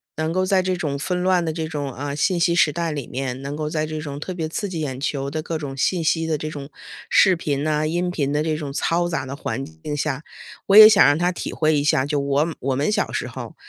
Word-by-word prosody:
能 160 Hz, 0 st, -2 dB
够 185 Hz, +1 st, +1 dB
在 185 Hz, 0 st, +3 dB
这 185 Hz, 0 st, -1 dB
种 145 Hz, -5 st, -2 dB
纷 180 Hz, +5 st, -2 dB
乱 185 Hz, -1 st, +3 dB
的 160 Hz, -, -1 dB
这 160 Hz, -1 st, -3 dB
种， 145 Hz, -3 st, -4 dB
嗯， 140 Hz, +1 st, -4 dB
信 175 Hz, +4 st, +1 dB
息 170 Hz, 0 st, +2 dB
时 160 Hz, -3 st, +4 dB
代 165 Hz, +1 st, -2 dB
里 145 Hz, -4 st, -5 dB
面， 130 Hz, 0 st, -4 dB
能 140 Hz, +1 st, -5 dB
够 155 Hz, -1 st, -3 dB
在 155 Hz, 0 st, -1 dB
这 155 Hz, 0 st, -5 dB
种 145 Hz, -2 st, -6 dB
特 185 Hz, +5 st, -5 dB
别 165 Hz, -3 st, -3 dB
刺 205 Hz, +5 st, -3 dB
激 170 Hz, -3 st, -4 dB
眼 135 Hz, -4 st, -3 dB
球 140 Hz, -1 st, -2 dB
的 155 Hz, +2 st, -3 dB
各 160 Hz, +1 st, -4 dB
种 145 Hz, -3 st, -6 dB
信 170 Hz, +6 st, 0 dB
息 165 Hz, +1 st, +1 dB
的 160 Hz, -1 st, 0 dB
这 155 Hz, +1 st, -5 dB
种 145 Hz, -2 st, -8 dB, 0.4 s
视 190 Hz, -2 st, +5 dB
频 145 Hz, -3 st, -2 dB
啊， 155 Hz, 0 st, +1 dB
音 175 Hz, +3 st, -1 dB
频 140 Hz, -5 st, -1 dB
的 150 Hz, -, +1 dB
这 155 Hz, -1 st, -1 dB
种 150 Hz, -3 st, -5 dB
嘈 175 Hz, +4 st, 0 dB
杂 165 Hz, -5 st, -2 dB
的 135 Hz, +1 st, -6 dB
环 135 Hz, -1 st, -4 dB
境 155 Hz, 0 st, -7 dB
下， 145 Hz, 0 st, -2 dB, 0.4 s
我 200 Hz, -, +6 dB
也 215 Hz, 0 st, +13 dB
想 210 Hz, -2 st, +6 dB
让 145 Hz, +1 st, +4 dB
他 175 Hz, +2 st, +1 dB
体 175 Hz, -, -5 dB
会 155 Hz, -1 st, +2 dB
一 145 Hz, -, 0 dB
下， 135 Hz, -3 st, +2 dB
就 145 Hz, 0 st, -1 dB
我 140 Hz, +4 st, 0 dB
我 135 Hz, +1 st, -1 dB
们 140 Hz, +3 st, 0 dB
小 210 Hz, -, 0 dB
时 -, -, -3 dB
候， -, -, -8 dB
155 Hz, 290 characters per minute, -22 LUFS, 140-170 Hz, 0.4 s, 也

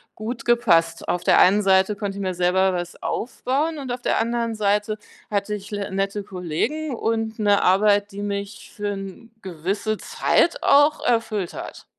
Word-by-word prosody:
gut 225 Hz, +3 st, -6 dB
gepasst. 170 Hz, -9 st, +2 dB
Auf 175 Hz, -, -1 dB
der -, -, +5 dB
einen 200 Hz, +3 st, +5 dB
Seite 190 Hz, +1 st, +3 dB
konnte 200 Hz, -1 st, -4 dB
ich -, -, -4 dB
mir 185 Hz, -2 st, -2 dB
selber 185 Hz, +1 st, +2 dB
was 175 Hz, -1 st, -5 dB
aufbauen 280 Hz, +6 st, -2 dB
und 265 Hz, -3 st, -5 dB
auf 245 Hz, 0 st, -4 dB
der -, -, +1 dB
anderen 235 Hz, 0 st, -1 dB
Seite 210 Hz, 0 st, 0 dB, 0.3 s
hatte 205 Hz, +1 st, -1 dB
ich 205 Hz, 0 st, -10 dB
l 205 Hz, -1 st, -3 dB
nette 195 Hz, +1 st, -2 dB
Kollegen 195 Hz, -, -3 dB
und 225 Hz, -1 st, -2 dB
'ne 205 Hz, -1 st, +3 dB
Arbeit, 205 Hz, +2 st, +3 dB
die 200 Hz, +1 st, -7 dB
mich 200 Hz, 0 st, -5 dB
für 205 Hz, -1 st, -3 dB
'ne 195 Hz, +4 st, -9 dB
gewisse 195 Hz, +5 st, -3 dB
Zeit 340 Hz, -, +1 dB
auch 290 Hz, +2 st, +4 dB
erfüllt 225 Hz, -6 st, 0 dB
hat. -, -, -8 dB
205 Hz, 170 wpm, -23 LUFS, 190-225 Hz, 0.3 s, der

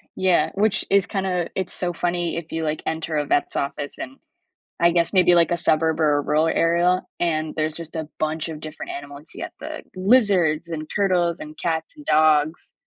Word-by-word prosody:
Yeah, 185 Hz, -2 st, +2 dB
which 215 Hz, +1 st, +1 dB
is 200 Hz, -1 st, +4 dB
kinda 185 Hz, -3 st, -2 dB
it's 190 Hz, -2 st, -3 dB
so 180 Hz, -1 st, -2 dB
funny 175 Hz, 0 st, -1 dB
if 170 Hz, -1 st, -7 dB
you, 160 Hz, 0 st, -2 dB
like, 155 Hz, 0 st, -2 dB
enter 160 Hz, -1 st, -2 dB
a 145 Hz, -, 0 dB
vet's 145 Hz, -, 0 dB
office 140 Hz, 0 st, -3 dB
in 270 Hz, +1 st, -7 dB, 0.6 s
I 170 Hz, -, +5 dB
guess 170 Hz, +2 st, +1 dB
maybe, 180 Hz, -2 st, +5 dB
like, 170 Hz, 0 st, +4 dB
a -, -, +3 dB
suburb 160 Hz, -1 st, +1 dB
or 150 Hz, -2 st, +4 dB
a -, -, +1 dB
rural 155 Hz, +3 st, +2 dB
area, 170 Hz, +3 st, +2 dB, 0.2 s
and 160 Hz, -2 st, 0 dB
there's 155 Hz, 0 st, -1 dB
just 165 Hz, -1 st, -9 dB
a 160 Hz, -1 st, -4 dB
bunch 155 Hz, +1 st, -2 dB
of 155 Hz, -2 st, -6 dB
different 155 Hz, -1 st, -7 dB
animals, 145 Hz, +2 st, -9 dB
you -, -, -6 dB
get -, -, -7 dB
the 310 Hz, +1 st, -7 dB
lizards 185 Hz, -6 st, +3 dB
and 155 Hz, -1 st, -5 dB
turtles 180 Hz, -4 st, +1 dB
and 155 Hz, 0 st, -9 dB
cats 160 Hz, -, -2 dB
and 295 Hz, -, -12 dB
dogs, 155 Hz, +1 st, +2 dB
165 Hz, 200 wpm, -23 LUFS, 155-180 Hz, 0.6 s, I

